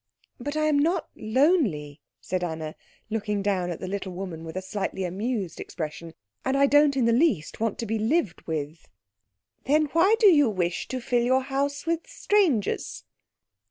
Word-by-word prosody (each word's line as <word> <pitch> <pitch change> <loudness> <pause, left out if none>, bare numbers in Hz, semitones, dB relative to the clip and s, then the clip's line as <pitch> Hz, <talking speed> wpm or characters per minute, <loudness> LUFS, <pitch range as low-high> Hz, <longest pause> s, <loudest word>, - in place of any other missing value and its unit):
"But 290 +5 -4
I 310 - +1
am 300 -2 +3
not 335 +5 +1
lonely," 215 - +1 0.2
said 185 -1 -3
Anna, 160 -2 -4 0.4
looking 210 -2 -1
down 190 -3 0
at 170 - -4
the - - -5
little 190 -1 -4
woman 175 -3 -6
with 160 +1 -8
a - - -2
slightly 190 0 -3
amused 195 0 -3
expression, 160 0 -6 0.3
"and 265 +1 +1
I 280 - +5
don't 290 0 +4
in 250 - +3
the 230 - +3
least 230 - +1
want 225 -1 -1
to 230 - -3
be 220 0 -1
lived 220 - 0
with." 155 0 -4 0.8
"Then 300 +2 +3
why 365 +7 +5
do 450 - +4
you 290 -8 +5
wish 180 -4 -2
to 255 -1 -4
fill 245 0 +1
your 260 +2 +2
house 280 +2 -2
with 335 0 -1
strangers?" 345 - 0
225 Hz, 175 wpm, -26 LUFS, 180-285 Hz, 0.8 s, I